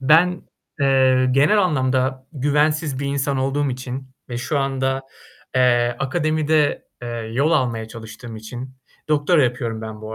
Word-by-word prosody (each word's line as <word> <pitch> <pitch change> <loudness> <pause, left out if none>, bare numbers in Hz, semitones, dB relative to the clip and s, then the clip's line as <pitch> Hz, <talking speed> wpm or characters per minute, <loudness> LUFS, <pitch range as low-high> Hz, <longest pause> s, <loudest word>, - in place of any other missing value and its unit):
Ben, 165 +6 +4 0.4
eee, 130 -2 +4
genel 150 +10 +4
anlamda 130 -5 0
güvensiz 145 0 +1
bir 140 - -2
insan 140 0 0
olduğum 135 +2 0
için 130 +1 -6 0.2
ve 120 - -4
şu 140 +4 -1
anda, 135 -1 -1 0.5
eee, 120 -1 +3
akademide, 155 +2 +1 0.2
eee, 120 - -4
yol 120 +6 -1
almaya 115 -5 0
çalıştığım 115 0 -9
için, 125 +4 -8 0.3
doktora 150 0 +3
yapıyorum 120 -2 -2
ben 110 -1 -7
bu 110 0 -7
130 Hz, 135 wpm, -21 LUFS, 120-145 Hz, 0.5 s, Ben